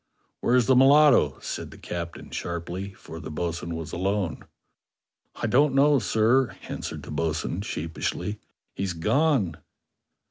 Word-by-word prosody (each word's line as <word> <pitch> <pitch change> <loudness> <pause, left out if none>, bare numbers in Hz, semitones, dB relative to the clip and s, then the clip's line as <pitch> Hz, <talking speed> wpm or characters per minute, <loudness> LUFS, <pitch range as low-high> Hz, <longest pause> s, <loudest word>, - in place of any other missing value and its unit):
"Where's 125 0 +3
the 130 - +4
mulatto?" 140 +2 +6
said - - -5
the - - -13
captain 85 -1 -6
sharply, 85 +3 -4
for 80 -3 -10
the 80 - -7
bo'sun 85 +1 -3
was 80 -1 -6
alone. 95 -1 -1 0.9
"I 120 - -3
don't 135 +5 +3
know, 145 0 +5
sir," 115 +5 +2
answered - - -5
the - - -9
bo'sun 80 +4 -2
sheepishly; 100 +4 -3 0.3
"he's 95 -1 -2
gone!" 105 - +1
100 Hz, 130 wpm, -26 LUFS, 85-130 Hz, 0.9 s, mulatto